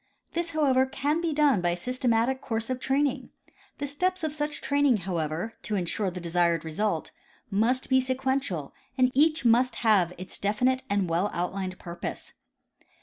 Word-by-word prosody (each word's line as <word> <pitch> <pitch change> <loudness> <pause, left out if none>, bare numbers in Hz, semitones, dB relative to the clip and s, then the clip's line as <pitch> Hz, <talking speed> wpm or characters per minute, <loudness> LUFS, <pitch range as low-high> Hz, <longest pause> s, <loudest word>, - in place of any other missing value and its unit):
This, 340 0 -1
however, 265 -4 +3
can 285 +4 -1
be 335 -2 0
done 290 -9 +3
by 175 - +1
a 175 - 0
systematic 250 +4 0
course 225 0 -3
of 255 - -2
training. 270 +1 0 0.5
The 285 - -3
steps 360 +6 -1
of 310 -2 -1
such 300 0 -3
training, 285 -4 +2
however, 170 +3 -2
to 210 - -2
in 185 -3 0
sure 195 +3 -1
the 180 0 -6
desired 170 -1 +1
result, 165 +1 -1 0.4
must 230 +6 +1
be 260 0 +4
sequential 260 - -2 0.2
and 255 -1 +4
each 305 0 +3
must 240 +2 +4
have 195 -6 +4
its 185 +1 -8
definite 250 +6 +1
and 200 -2 +1
well 170 +5 +1
outlined 185 +1 -3
purpose. 170 -1 -7
240 Hz, 165 wpm, -27 LUFS, 185-275 Hz, 0.5 s, be